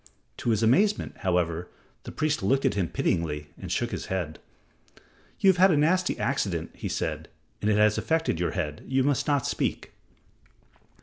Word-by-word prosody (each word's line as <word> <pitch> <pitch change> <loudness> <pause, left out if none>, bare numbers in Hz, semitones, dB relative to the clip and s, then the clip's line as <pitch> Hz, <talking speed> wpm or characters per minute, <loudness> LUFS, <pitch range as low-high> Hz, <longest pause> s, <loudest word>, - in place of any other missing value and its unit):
To - - -2
his 110 -1 +2
amazement, 195 - +2
however, 90 -2 -1 0.4
the - - -6
priest 155 -1 -1
looked 135 +1 +1
at 135 - +3
him 95 -4 0
pityingly 75 -4 -2
and - - -8
shook - - -1
his - - -5
head. 85 -5 -3 1.0
"You 195 - +6
have 185 - -4
had 190 +2 +6
a 160 - +3
nasty 175 +5 +2
accident," 95 - -1
he - - -5
said, - - -3 0.3
"and 105 - +1
it 105 - +3
has 105 0 +4
affected 160 - 0
your 90 - -1
head. 75 -5 -3
You 130 0 +2
must 140 -1 +1
not 145 -4 +1
speak." - - -2
110 Hz, 175 wpm, -27 LUFS, -, 1.0 s, You